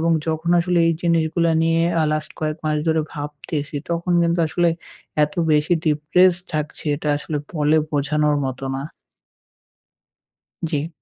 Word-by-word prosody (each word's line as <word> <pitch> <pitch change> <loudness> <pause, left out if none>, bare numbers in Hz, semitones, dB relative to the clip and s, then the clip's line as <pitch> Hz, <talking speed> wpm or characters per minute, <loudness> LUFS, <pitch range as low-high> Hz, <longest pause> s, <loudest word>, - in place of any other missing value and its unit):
এবং 165 +1 +2 0.2
যখন 160 +2 -1
আসলে 175 0 +1
এই 165 - +3
জিনিসগুলো 165 0 +2
নিয়ে 165 0 +2 0.2
আ - - +3
last 155 0 -2
কয়েক 155 0 -1
মাস 155 0 +1
ধরে 160 0 +3
ভাবতেছি, 145 0 -5
তখন 170 +1 -1
কিন্তু 170 +1 +1
আসলে 175 +2 +1 0.5
এত 150 0 0 0.2
বেশি 150 +3 +2
depressed 170 +4 +3
থাকছি, 150 0 -4
এটা 150 0 -4
আসলে 150 +1 -4 0.2
বলে 150 0 +3
বোঝানোর 150 0 +1
মতো 130 0 -4
না। 135 - -3 1.9
জি। 150 +1 -1
155 Hz, 140 wpm, -21 LUFS, 150-170 Hz, 1.9 s, এই